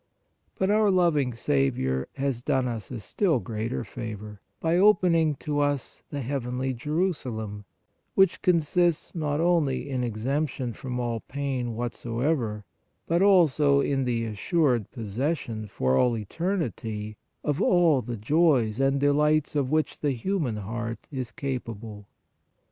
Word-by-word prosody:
But 190 +1 +1
our 210 0 +4
loving 170 -8 +3
Saviour 65 - 0
has 135 -3 -1
done 130 0 +1
us 115 -5 -5
a 125 - -5
still 160 - +1
greater 110 +3 -3
favor, 105 -3 -7 0.2
by 165 +1 +1
opening 175 -5 +4
to 145 +1 -2
us 145 -2 -1
the 145 - -4
heavenly 130 0 -2
Jerusalem, 125 - -2 0.5
which 190 -2 +4
consists 170 -1 +2
not 150 -3 -1
only 165 -7 +1
in 130 -3 -2
exemption 125 +2 -2
from 125 +2 -5
all 120 -2 -1
pain 130 -3 -3
whatsoever, 120 -1 -2 0.4
but 170 +2 +1
also 155 -8 +5
in 135 -1 +1
the 115 -2 0
assured 120 - +1
possession 115 0 -3
for 65 -9 0
all 120 - +3
eternity 110 - -3 0.3
of 145 -1 0
all 170 -7 +4
the 120 0 -5
joys 130 -2 +2
and 135 0 +2
delights 150 +2 +2
of 140 -3 +1
which 155 +1 0
the 145 -2 0
human 145 - -1
heart 115 +3 -5
is 130 -4 -4
capable. 115 -6 -5
130 Hz, 130 wpm, -26 LUFS, 115-155 Hz, 0.5 s, also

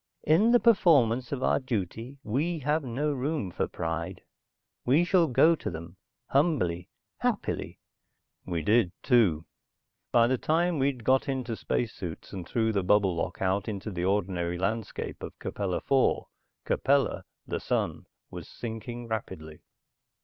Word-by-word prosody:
In 185 +10 +4
the 245 - +6
performance 135 - +4
of 135 -2 -2
our - - +3
duty, 115 +1 -4
we 155 +10 -1
have 150 +2 0
no 140 +4 -1
room 135 - -2
for - - -1
pride. 80 0 -4 0.6
We 140 +7 +4
shall 175 -2 +4
go 155 +5 +5
to 165 - -4
them, 85 +1 -8 0.3
humbly, 135 - +1 0.3
happily." - - -2 0.7
We 85 -3 -3
did, 105 -1 +3
too. 100 - +3 0.7
By 115 -1 +5
the 125 +1 +1
time 170 0 +1
we'd 135 -3 0
got 130 +3 +2
into 130 -4 -2
space 115 +1 -2
suits 85 0 -7
and 90 -3 -6
through 110 -1 +1
the 100 - +1
bubble 95 -1 +3
lock 85 - -3
out 95 +1 0
into 105 0 -4
the 90 -1 -2
ordinary 90 -3 0
landscape 105 +4 -3
of - - -8
Capella 95 -3 -3
IV, 135 -1 +3 0.4
Capella, 140 0 +1 0.2
the - - -3
sun, - - -2 0.2
was - - -8
sinking 120 +1 -6
rapidly. 95 -8 -5
115 Hz, 145 wpm, -28 LUFS, 95-140 Hz, 0.7 s, the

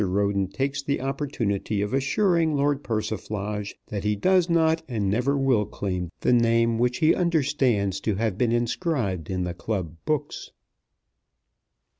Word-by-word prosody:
Roden 100 0 +1
takes 135 +8 -2
the 140 0 -1
opportunity 125 -7 -2
of 105 - -4
assuring 160 +3 +2
Lord 145 0 +1
Persiflage 105 -2 -3
that 100 -3 -4
he 105 0 +1
does 180 - +3
not 160 -1 +3
and 105 -5 -1
never 125 +6 +1
will 130 -6 +2
claim 90 -3 -3
the - - +3
name 115 -1 +3
which 125 0 +1
he 155 - +4
understands 135 - +1
to 105 0 -1
have 110 -1 -1
been 115 +2 +1
inscribed 120 - -1
in 90 -1 -1
the 90 -1 -3
club 90 -3 -4
books. 150 -1 -3
115 Hz, 145 wpm, -25 LUFS, 100-140 Hz, -, he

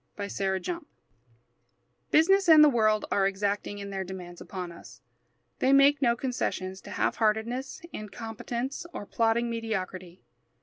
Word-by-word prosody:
WANTED 195 -2 -2
A - - 0
MAN 340 -3 -10 1.2
Business 385 +4 +4
and 310 -1 +9
the 300 - +7
world 215 -4 +2
are 195 -1 +3
exacting 200 +1 -2
in 200 0 -7
their 190 -1 -3
demands 180 -2 -9
upon 180 -2 -6
us. 170 - -13 0.6
They 260 - +3
make 275 +1 +5
no 235 -3 +3
concessions 195 -7 -3
to - - -12
half - - -1
heartedness, 235 - -1
incompetence, 235 - -5
or - - -5
plodding 230 +2 +1
mediocrity. 190 -6 -4
220 Hz, 140 wpm, -28 LUFS, 195-255 Hz, 1.2 s, and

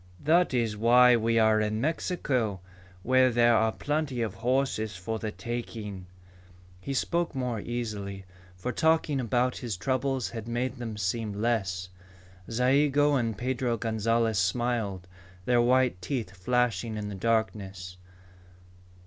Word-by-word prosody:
"That 170 +4 +4
is 115 -4 0
why 120 +3 +6
we 115 0 +1
are 110 -1 +4
in 110 0 -1
Mexico, 130 - -1 0.4
where 130 +2 +4
there 120 -1 +4
are 110 0 +3
plenty 145 -2 -2
of 110 -4 -3
horses 120 -4 -1
for 110 +5 -4
the 110 -1 -3
taking." 110 -6 -6 0.7
He 95 - -6
spoke 170 +3 -1
more 125 -4 -2
easily, 105 -4 -5 0.3
for 105 +8 -4
talking 160 +1 +2
about 125 +1 0
his 115 -7 -4
troubles 130 -2 -1
had 115 -1 -6
made 120 +3 -2
them 115 -3 -5
seem 105 +2 -2
less. 100 -4 -1 0.6
Zayigo 140 +4 +3
and 115 -6 0
Pedro 125 0 -1
Gonzalez 115 -1 0
smiled, 105 -2 -1 0.4
their 120 -1 +3
white 125 -5 +2
teeth 115 -1 -3
flashing 115 +1 0
in 105 -1 -4
the 105 - -5
darkness. 95 -3 -2
115 Hz, 130 wpm, -28 LUFS, 105-125 Hz, 0.7 s, why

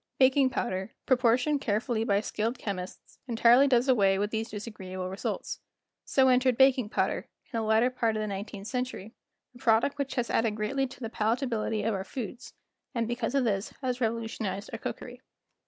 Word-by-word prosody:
Baking 265 0 +5
powder, 190 -5 -3
proportioned 255 +3 +3
carefully 220 +1 0
by 200 -2 +2
skilled 225 +3 -2
chemists, 185 -3 -6
entirely 240 +3 +5
does 250 -1 +3
away 200 -7 +4
with 205 +2 -1
these 225 0 -2
disagreeable 190 -4 -6
results. 190 - -4 0.5
So 265 -1 +3
entered 255 -1 +3
baking 265 -4 +4
powder, - - -1 0.2
in - - -31
the 230 -3 -1
latter 220 +3 +3
part 230 -3 0
of - - -1
the - - -1
nineteenth 200 0 -6
century, 250 -3 -4 0.4
a 245 - -15
product 240 +3 +2
which 280 -1 -2
has 245 -2 -1
added 225 -2 +1
greatly 265 +6 -1
to 255 - -13
the 225 -2 -4
palatability 225 -1 0
of 225 - +1
our 190 -1 -2
foods, 240 +3 -7 0.4
and 230 -1 0
because 240 +2 -2
of 275 - +3
this 200 -3 -1
has 250 -1 -1
revolutionized 220 -3 -2
our - - -4
cookery. - - -6
230 Hz, 175 wpm, -29 LUFS, 210-255 Hz, 0.5 s, Baking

